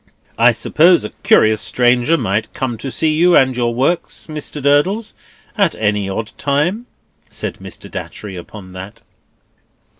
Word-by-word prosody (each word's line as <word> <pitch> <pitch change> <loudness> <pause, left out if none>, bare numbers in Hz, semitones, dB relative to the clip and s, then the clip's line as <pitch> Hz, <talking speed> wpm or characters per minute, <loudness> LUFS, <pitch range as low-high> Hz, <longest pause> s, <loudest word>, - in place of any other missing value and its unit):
"I - - +6
suppose 170 -3 +3
a - - -6
curious 110 0 +4
stranger 125 +5 +2
might 110 -4 -1
come 130 -3 -2
to 135 - -5
see 155 +4 0
you, 175 +3 +4
and 130 -1 +3
your 120 -1 -1
works, 140 +8 -1
Mr. 150 -1 -6
Durdles, 145 +11 +1 0.4
at 200 -6 +2
any 105 -2 -1
odd 105 +3 -4
time?" 170 - 0 0.4
said - - -5
Mr. - - -9
Datchery 100 -3 -7
upon 95 +2 -10
that. 100 +5 -10
130 Hz, 145 wpm, -17 LUFS, 110-160 Hz, 0.4 s, I